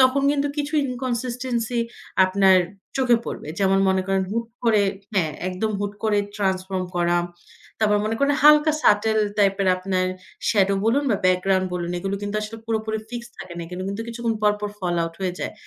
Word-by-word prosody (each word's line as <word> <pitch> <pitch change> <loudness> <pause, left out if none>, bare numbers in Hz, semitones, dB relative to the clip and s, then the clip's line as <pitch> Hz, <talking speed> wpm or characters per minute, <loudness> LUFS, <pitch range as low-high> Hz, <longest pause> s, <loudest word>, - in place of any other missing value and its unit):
তখন 260 +1 +4
কিন্তু 285 0 0
কিছু 295 0 -2
inconsistency 245 -1 -2 0.5
আপনার 190 0 +5 0.4
চোখে 255 -3 +4
পড়বে। - - -6
যেমন 195 -1 +3
মনে 190 0 +2
করেন 195 0 +1
হুট 230 +2 -2 0.2
করে 220 -3 +4 0.3
হ্যাঁ, 165 -6 +1 0.2
একদম 185 +4 -2
হুট 205 0 -2
করে 210 -1 +2 0.2
ট্রান্সফর্ম 190 -2 -1
করা। 175 0 +2 0.6
তারপর 210 -1 +3
মনে 215 +1 0
করেন 280 +1 +3
হালকা 300 +1 +7
সাটেল 220 +1 +4 0.2
টাইপের 195 -1 +3
আপনার 185 0 -1 0.4
স্যাডো 200 -3 +3
বলুন 240 +6 +3
বা 210 - +3
ব্যাকগ্রাউন্ড 185 +1 +2
বলুন 175 -1 -3
এগুলো 195 +2 -3
কিন্তু 205 +1 -3
আসলে 215 +1 -6
পুরোপুরি 220 -1 -1
ফিক্সড 240 0 -7
থাকে 175 - -8
না। 170 - -4
এখানে 180 +2 -6
কিন্তু 200 +3 -4
কিছুক্ষণ 235 -1 -2
পর, 210 0 +5
পর, 210 0 -3
ফল 180 -3 -1
আউট 165 0 -4
হয়ে 185 -2 -1
যায়। - - -3
210 Hz, 175 wpm, -23 LUFS, 190-235 Hz, 0.6 s, হালকা